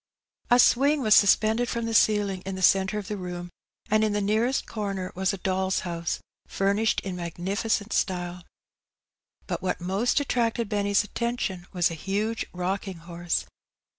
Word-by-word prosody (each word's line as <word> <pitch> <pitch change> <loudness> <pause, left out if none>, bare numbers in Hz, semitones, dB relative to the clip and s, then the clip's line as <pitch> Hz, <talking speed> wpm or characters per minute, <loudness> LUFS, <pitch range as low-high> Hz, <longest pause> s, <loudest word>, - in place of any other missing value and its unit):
A 245 - +6
swing 275 +4 +4
was 215 -2 +5
suspended 220 +4 +4
from 235 -1 -2
the 230 - -2
ceiling 205 -4 +3
in 195 0 -4
the 190 - -4
centre 195 +3 +4
of 205 -3 -5
the 210 - -3
room, 175 -1 -6 0.4
and 215 -1 +3
in 215 -1 +1
the 205 - +1
nearest 220 +6 +1
comer 195 -4 -4
was 190 +1 0
a 195 - -4
dolFs 190 0 0
house 170 -1 -3 0.3
furnished 200 +3 +1
in 190 -2 -5
magnificent 195 +5 -2
style. 180 -2 -1 1.0
But - - -3
what 185 - -1
most 195 - +1
at 285 - -3
tracted 230 -2 0
Benny's 205 -1 +2
attention 210 -5 -3
was 175 -3 +1
a - - -3
huge 205 +7 -2
rocking 185 +1 -3
horse. 170 +1 -3
200 Hz, 165 wpm, -26 LUFS, 185-220 Hz, 1.0 s, A